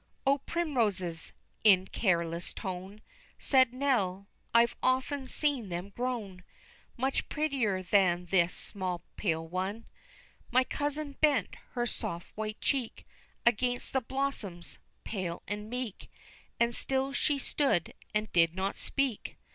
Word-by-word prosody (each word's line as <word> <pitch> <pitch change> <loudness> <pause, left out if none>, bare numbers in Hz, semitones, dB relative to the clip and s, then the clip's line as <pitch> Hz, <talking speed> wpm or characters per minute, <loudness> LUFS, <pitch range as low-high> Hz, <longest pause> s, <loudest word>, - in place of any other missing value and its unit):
"O, 275 +1 +4
primroses!" 215 - -1 0.3
in 190 -4 +7
careless 170 -5 0
tone, 190 +2 -5 0.4
Said 260 -3 +4
Nell, 215 -8 0 0.2
"I've 235 0 +5
often 260 +1 +1
seen 270 -8 0
them 175 +3 -4
grown 210 -5 -3 0.5
Much 265 +2 0
prettier 260 -11 0
than 180 -2 +3
this 175 -1 +3
small 185 -3 -3
pale 165 -4 -1
one." 190 +6 -3 0.6
My 255 +1 +4
cousin 290 +1 -3
bent 285 -9 +3 0.2
her 240 -1 0
soft 170 -7 -4
white 215 0 -4
cheek 260 -5 -1 0.4
Against 245 +1 +2
the 265 - +2
blossoms, 230 -9 -3 0.2
pale 185 -5 -4
and 210 +2 -4
meek, 245 -4 -4 0.5
And 235 0 +3
still 270 +3 +1
she 290 0 +2
stood 275 - +1 0.2
and 215 0 -1
did 165 -1 +4
not 190 +1 -1
speak. 275 -6 -1
215 Hz, 125 wpm, -31 LUFS, 185-265 Hz, 0.6 s, in